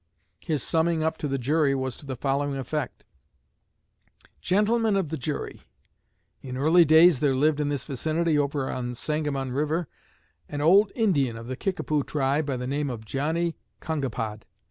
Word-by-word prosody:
His 150 -5 -1
summing 165 0 +1
up 160 0 0
to 150 - -2
the 135 -1 -1
jury 140 +2 +2
was 130 -2 -3
to 145 - -13
the 130 - -3
following 140 +2 -1
effect: 135 +1 -4 1.4
"Gentlemen 215 +2 +2
of 190 -6 0
the 160 - -2
jury: 145 +3 -4 0.8
In 130 -1 -6
early 160 +5 +5
days 160 -1 +6
there 140 -2 +2
lived 150 +2 +2
in 145 -1 0
this 140 -3 -2
vicinity, 155 +4 0
over 145 -2 0
on 125 -1 -3
the 125 - -5
Sangamon 145 -1 -2
river, 155 +5 -1 0.6
an 145 - -4
old 195 +7 +5
Indian 145 - +1
of 115 - -8
the 130 +2 -4
Kickapoo 155 -3 -1
tribe 140 +2 0
by 135 -3 -1
the 125 - -4
name 140 +2 -1
of 115 -3 -6
Johnnie 160 +7 -1 0.2
Kongapod. 120 -8 -3
145 Hz, 165 wpm, -26 LUFS, 135-160 Hz, 1.4 s, days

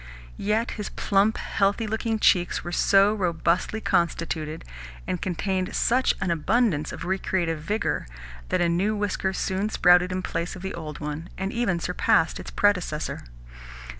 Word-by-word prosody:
Yet 215 +4 0
his 205 - -4
plump, 200 +2 +1
healthy 200 +3 0
looking 220 +1 -1
cheeks 180 -4 +2
were 175 - -5
so 195 +4 +4
robustly 180 +1 0
constituted, 165 -4 -1 0.4
and 180 - -3
contained 185 +1 -2
such 255 +2 +2
an 180 - -1
abundance 170 -1 +1
of - - -7
recreative 180 -3 -1
vigour, 205 - -1 0.4
that - - +1
a 175 - +3
new 190 +6 +1
whisker 205 -2 -1
soon 190 +2 -1
sprouted 180 -2 +4
in 185 0 -2
place 170 +1 -3
of 185 - -10
the 190 - -4
old 155 -3 -7
one, 150 +3 -5
and 195 +1 -3
even 230 -8 0
surpassed 170 -2 +1
its - - -7
predecessor. 180 -7 0
185 Hz, 150 wpm, -25 LUFS, 170-205 Hz, 0.4 s, so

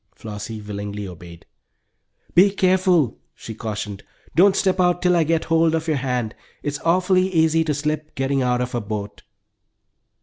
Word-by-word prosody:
Flossie 105 +1 -7
willingly 105 0 -5
obeyed. 85 -1 -12 0.9
"Be 185 +4 +6
careful!" 185 - +2 0.2
she 115 - -8
cautioned. 105 -3 -5 0.3
"Don't 190 +3 +5
step 190 -1 +1
out 180 -1 +3
till 180 -1 +4
I 170 - +4
get 160 +1 +1
hold 165 0 +3
of 160 0 -3
your 155 -2 +1
hand. 125 -4 -2 0.3
It - - -1
is 145 0 -5
awfully 185 +2 +2
easy 160 -1 +3
to 155 - 0
slip 150 +1 -3
getting 135 0 0
out 125 -1 +1
of 125 0 -3
a 120 - -1
boat." 105 -1 -6
145 Hz, 165 wpm, -22 LUFS, 110-170 Hz, 0.9 s, Be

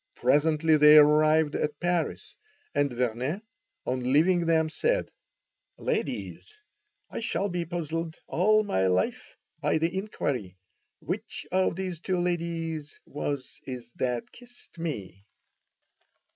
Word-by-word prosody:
Presently 155 +4 +3
they 150 +1 +8
arrived 150 +1 +5
at 150 -1 -2
Paris, 175 -1 -1 0.4
and 145 -2 +2
Vernet, 125 - -2 0.4
on 125 0 -1
leaving 170 +4 +4
them, 160 -1 +3
said: 480 - 0 0.7
"Ladies, - - -3 0.6
I - - -4
shall 205 -3 -1
be 175 -1 -2
puzzled 165 -1 -3
all 215 +5 +3
my 95 - +1
life 90 0 -1 0.2
by - - +1
the 165 +3 0
inquiry, 130 - -3 0.4
which - - -5
of 185 -2 +2
these 185 -3 -4
two 185 +1 -1
ladies 165 -3 -2
was 145 -2 -4
it 125 -2 -6
that 125 -2 -2
kissed 245 -7 -16
me?" 100 - -5
160 Hz, 115 wpm, -28 LUFS, 140-175 Hz, 0.7 s, they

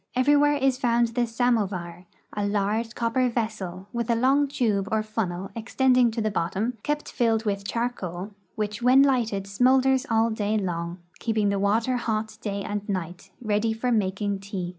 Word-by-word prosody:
Everywhere 290 +3 +4
is 270 -2 +1
found 235 -2 +2
the 240 +1 0
samovar, 200 -7 -1 0.3
a 205 - -2
large 210 +3 -1
copper 245 +2 +1
vessel, 210 -6 -4
with 235 -1 -2
a 235 - +3
long 270 +5 +3
tube 215 -8 0
or 220 0 +1
funnel 195 -4 -3
extending 250 +2 +3
to 225 0 -3
the 215 0 0
bottom, 205 +6 -2
kept 295 +3 -3
filled 225 -2 +1
with 200 -1 -2
charcoal, 200 -5 -3 0.2
which 210 +1 -3
when 255 +3 +6
lighted 230 -8 +1
smoulders 260 +5 +3
all 225 0 +2
day 215 0 0
long, 170 -3 -3 0.2
keeping 220 -3 +1
the 200 0 0
water 225 +5 +1
hot 220 -2 -2
day 200 -1 -3
and 205 +1 -4
night, 180 -1 -4
ready 215 +1 +1
for 245 +3 -1
making 200 -2 0
tea. 195 -3 -5
220 Hz, 165 wpm, -25 LUFS, 200-245 Hz, 0.3 s, when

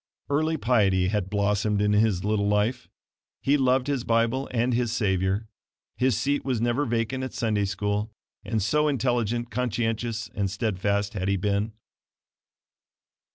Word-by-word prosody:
Early 155 +3 +1
piety 100 -8 +2
had 100 -2 -1
blossomed 105 0 +1
in 105 0 +2
his 105 -3 +2
little 105 -1 +1
life. 105 +4 0 0.5
He 140 - +2
loved 130 -2 +2
his 140 -4 -1
Bible 115 +4 +1
and 120 +1 0
his 120 -1 0
Savior. 95 -1 0 0.5
His 125 -4 +2
seat 140 +1 0
was 130 -4 -1
never 120 +5 +1
vacant 120 +3 -1
at 130 - -5
Sunday 105 -3 0
school, 105 +3 -2 0.3
and 110 -1 -1
so 150 +8 +2
intelligent, 120 -3 0
conscientious 115 -1 -1
and 100 -1 -1
steadfast 100 0 -1
had 95 -3 -2
he 100 0 +2
been. 105 +3 -1
110 Hz, 145 wpm, -26 LUFS, 100-125 Hz, 0.5 s, piety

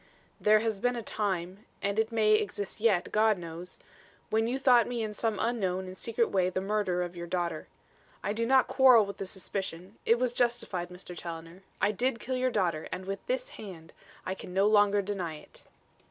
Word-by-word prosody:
"There 215 0 +5
has 220 -3 -1
been 245 +3 +1
a 235 - -4
time 190 -2 -2 0.2
and 200 +2 -1
it 220 +1 +1
may 215 -2 +3
exist 205 0 -1
yet, 205 -6 +2
God 215 -1 +3
knows 170 +1 -8 0.5
when 225 +1 +2
you 250 +3 0
thought 250 -4 +5
me 240 -2 -2
in 215 -1 -3
some 220 -1 -1
unknown 190 -6 0
and 185 0 -8
secret 230 +3 -1
way 185 -2 +2
the 185 - -2
murderer 195 -2 0
of 175 0 -6
your 170 0 -6
daughter. 170 -3 -2 0.6
I 205 - -1
do 230 +1 -1
not 265 0 +5
quarrel 255 -5 +6
with 200 - -7
the 195 - -4
suspicion; 190 0 -5
it 230 - +4
was 245 0 0
justified, 240 -8 0
Mr. 180 0 -9
Challoner. 165 +1 -8 0.2
I 200 +2 +3
did 240 +3 0
kill 260 +2 -3
your 255 0 +1
daughter, 175 -9 0
and 185 - -5
with 195 +1 -4
this - - -1
hand! 170 -6 -10 0.3
I 185 - -1
can 180 -1 -9
no 195 +1 +4
longer 205 -1 +4
deny 185 -5 -3
it." 150 - -14
205 Hz, 200 wpm, -29 LUFS, 180-230 Hz, 0.6 s, quarrel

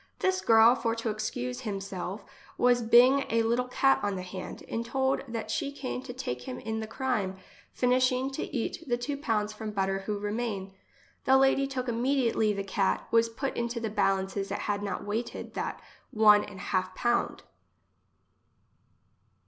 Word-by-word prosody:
This 375 0 +1
girl, 225 +1 +7
for 230 -3 -1
to 230 -1 -2
excuse 245 +4 -3
him 210 -6 -3
selve, 195 0 -6 0.3
was 245 0 +4
bing 250 +4 +6
a 230 0 +2
little 240 +2 +1
cat 270 +2 +3
on 205 -1 -1
the 185 - -4
hand, 185 0 -7
and 230 - -2
told 265 +3 0
that 230 -2 -4
she 280 - -1
came 265 -3 -5
to 250 - -8
take 125 - -4
him 125 - -4
in 220 +6 -4
the 220 - -4
crime, 220 -6 -2 0.3
finishing 255 +1 +2
to 270 - -4
eat 270 +6 -3
the 240 -1 +1
two 280 +4 -3
pounds 215 -7 -1
from 215 0 -6
butter 195 -2 -1
who 210 -1 -1
remain. 205 -2 -3 0.5
The 265 0 +6
Lady 270 +1 +3
took 260 -2 -4
immediately 235 -2 +1
the 200 -1 -2
cat, 195 0 0
was 230 0 +4
put 265 +4 -4
into 235 0 -2
the 225 -2 -3
balances 195 -1 0
it - - -3
had 205 -1 -1
not 205 -1 -4
weighted 220 +4 -4
that - - -3 0.3
one 210 -1 +6
an 205 - -11
half 185 -1 -2
pound. 240 0 0
230 Hz, 175 wpm, -29 LUFS, 205-250 Hz, 0.5 s, girl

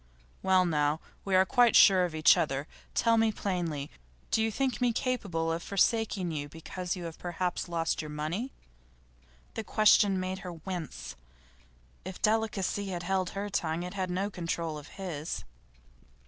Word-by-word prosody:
'Well 185 -1 +4
now, 150 -2 +1 0.2
we 195 -1 +1
are 185 0 +6
quite 245 +2 +4
sure 185 -3 +7
of 170 -3 -5
each 155 0 +6
other. 140 -2 -1 0.3
Tell 230 -1 +4
me 225 0 +3
plainly, 170 -8 -3 0.4
do 220 - +3
you 225 - +2
think 260 +3 -1
me 245 -1 +3
capable 200 -10 -1
of 165 +1 -2
forsaking 200 -2 +1
you 145 -2 -4
because 175 +4 -5
you 180 - -7
have 165 -1 -7
perhaps 175 0 -2
lost 165 -1 0
your 155 - -7
money?' 155 - -3 1.0
The 225 - -4
question 210 -3 +4
made 185 +1 -3
her 180 -1 -7
wince. 165 - -6 0.9
If 185 0 -7
delicacy 210 -2 0
had 175 -2 -4
held 185 0 0
her 200 +1 -2
tongue, 170 -4 -1
it 180 +1 -6
had 190 -2 -2
no 195 +3 -1
control 165 -3 -3
of 145 - -12
HIS. 170 -5 -4
180 Hz, 160 wpm, -30 LUFS, 165-200 Hz, 1.0 s, sure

